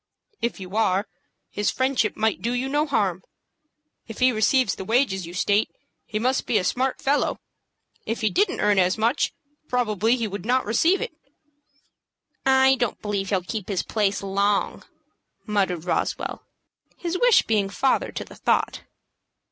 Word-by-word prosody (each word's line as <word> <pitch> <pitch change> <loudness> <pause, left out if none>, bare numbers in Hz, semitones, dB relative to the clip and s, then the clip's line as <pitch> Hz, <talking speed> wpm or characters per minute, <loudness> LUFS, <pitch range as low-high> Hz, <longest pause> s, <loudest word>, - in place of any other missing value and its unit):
"If 235 -2 -2
you 185 +1 -8
are, 200 -3 +2 0.5
his 205 - 0
friendship 260 -5 0
might 220 -1 0
do 235 +2 -1
you 250 +2 -1
no 295 +3 0
harm. 190 - 0 0.8
If 225 - -9
he 255 0 +4
receives 225 0 +2
the - - -6
wages 190 -5 +1
you 175 - -9
state, 205 +3 +2 0.4
he 215 - -3
must 255 +4 0
be 225 - +2
a 190 - +1
smart 255 +6 0
fellow. 285 +2 0 0.6
If 225 - -3
he 215 - +1
didn't 385 0 +1
earn 205 -1 +3
as 185 +2 +2
much, 230 +6 +1 0.4
probably 225 -2 +1
he 230 -3 -2
would 200 -2 -6
not 255 +4 +1
receive 325 - +2
it." - - -3 1.4
"I 265 0 +5
don't 240 -3 -1
believe 200 -2 -3
he'll 190 -3 0
keep 210 +1 -5
his 190 -3 -1
place 205 -2 -1
long," 200 +1 0 0.6
muttered 190 -6 -1
Roswell, 180 - -2 0.5
his 350 +1 -3
wish - - +5
being 210 -3 +1
father 260 +7 0
to - - -5
the - - -14
thought. - - 0
220 Hz, 160 wpm, -24 LUFS, 200-255 Hz, 1.4 s, I